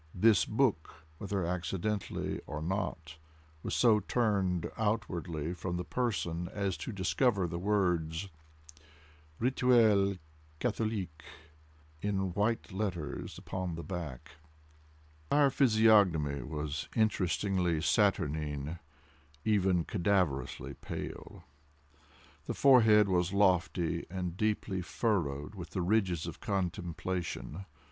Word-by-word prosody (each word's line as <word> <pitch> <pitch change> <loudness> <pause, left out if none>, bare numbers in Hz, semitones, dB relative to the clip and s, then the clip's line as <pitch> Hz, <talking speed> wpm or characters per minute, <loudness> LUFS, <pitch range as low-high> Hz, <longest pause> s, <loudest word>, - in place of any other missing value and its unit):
This 100 -2 +5
book, 105 - 0
whether 100 -3 -2
accidentally 90 +3 -2
or 75 +1 -4
not, 80 -2 -3 0.4
was - - -3
so 115 -3 +5
turned 100 -5 0
outwardly 90 -7 -2
from 90 0 -4
the 90 - -2
person 90 -8 -2
as 100 -3 -1
to - - -5
discover 100 +1 +1
the 85 0 -3
words 90 -3 0 1.1
"Rituel 115 -5 +4 0.4
Catholique" 105 -9 -2 0.8
in 95 -3 -1
white 105 +3 0
letters 95 -7 -4
upon 95 -3 -4
the 85 - -6
back. 85 -9 -6
His - - -16 1.0
entire 145 -1 +5
physiognomy 105 - +4
was 75 -1 -4
interestingly 95 -5 +1
saturnine—even 80 +1 -1
cadaverously 90 - 0
pale. - - -7 1.0
The - - -3
forehead 110 -6 +6
was 90 0 +1
lofty, 90 -3 +2
and 90 -2 -4
deeply 105 -2 -1
furrowed 85 - -1
with 90 -5 -8
the 90 +2 -2
ridges 90 -4 +1
of 85 0 -7
contemplation. 90 -2 -3
95 Hz, 100 wpm, -32 LUFS, 85-105 Hz, 1.1 s, forehead